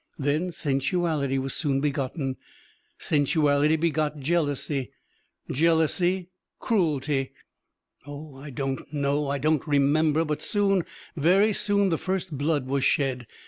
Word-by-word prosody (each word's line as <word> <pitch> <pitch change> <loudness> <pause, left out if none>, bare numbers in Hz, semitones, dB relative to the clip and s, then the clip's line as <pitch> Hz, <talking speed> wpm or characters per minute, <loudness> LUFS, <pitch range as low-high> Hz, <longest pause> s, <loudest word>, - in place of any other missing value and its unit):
Then 150 +5 0
sensuality 145 -1 0
was 135 0 -2
soon 140 -4 +1
begotten, 135 -1 -2 0.6
sensuality 145 0 +2
begot 155 -2 0
jealousy, 145 -3 -1 0.6
jealousy 170 +4 +1 0.3
cruelty.... 150 - 0 0.7
Oh, 145 0 -9
I 140 +2 -9
don't 135 0 -4
know, 145 0 0
I 140 - 0
don't 155 +2 0
remember; 150 +2 +3
but 150 -1 -3
soon, 195 -4 +1 0.3
very 190 +7 +3
soon 200 -1 +2
the 165 - 0
first 185 -4 -3
blood 145 -1 0
was 135 +1 -1
shed. 130 -4 +1
150 Hz, 115 wpm, -26 LUFS, 140-165 Hz, 0.7 s, remember